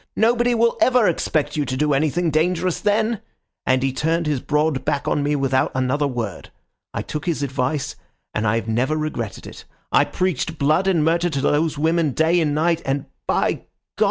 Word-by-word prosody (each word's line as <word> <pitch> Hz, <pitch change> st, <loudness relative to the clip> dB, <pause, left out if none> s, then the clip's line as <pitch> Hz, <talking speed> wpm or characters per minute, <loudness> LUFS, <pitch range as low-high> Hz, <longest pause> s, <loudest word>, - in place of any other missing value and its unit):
'Nobody 240 Hz, +2 st, +3 dB
will 230 Hz, 0 st, +2 dB
ever 250 Hz, -4 st, +4 dB
expect 155 Hz, -3 st, 0 dB
you 150 Hz, -, +1 dB
to 130 Hz, -2 st, -3 dB
do 150 Hz, +1 st, +2 dB
anything 155 Hz, +4 st, +1 dB
dangerous 175 Hz, +3 st, +1 dB
then.' 215 Hz, +1 st, +1 dB, 0.5 s
And 130 Hz, 0 st, +3 dB
he 135 Hz, -1 st, 0 dB
turned 165 Hz, +4 st, 0 dB
his 150 Hz, -3 st, 0 dB
broad 150 Hz, -1 st, 0 dB
back 140 Hz, -, -1 dB
on 145 Hz, -, +1 dB
me 145 Hz, +1 st, 0 dB
without 135 Hz, -2 st, +1 dB
another 130 Hz, +3 st, +1 dB
word. 115 Hz, -, -5 dB, 0.4 s
I -, -, -3 dB
took 150 Hz, +3 st, -5 dB
his 160 Hz, -4 st, 0 dB
advice, 135 Hz, +2 st, -2 dB, 0.4 s
and 105 Hz, -, -1 dB
have 115 Hz, +2 st, 0 dB
never 125 Hz, +7 st, 0 dB
regretted 155 Hz, -8 st, -4 dB
it. -, -, -10 dB, 0.3 s
I -, -, +4 dB
preached 165 Hz, -3 st, -2 dB
blood 155 Hz, +7 st, +2 dB
and 170 Hz, -5 st, +2 dB
murder 170 Hz, +2 st, +2 dB
to 140 Hz, -4 st, -2 dB
those 150 Hz, +2 st, +1 dB
women 160 Hz, -1 st, +1 dB
day 165 Hz, +4 st, +3 dB
and 150 Hz, -2 st, 0 dB
night, 165 Hz, +2 st, +1 dB
and—by 135 Hz, 0 st, -1 dB
God! -, -, -7 dB
150 Hz, 185 wpm, -21 LUFS, 135-170 Hz, 0.5 s, ever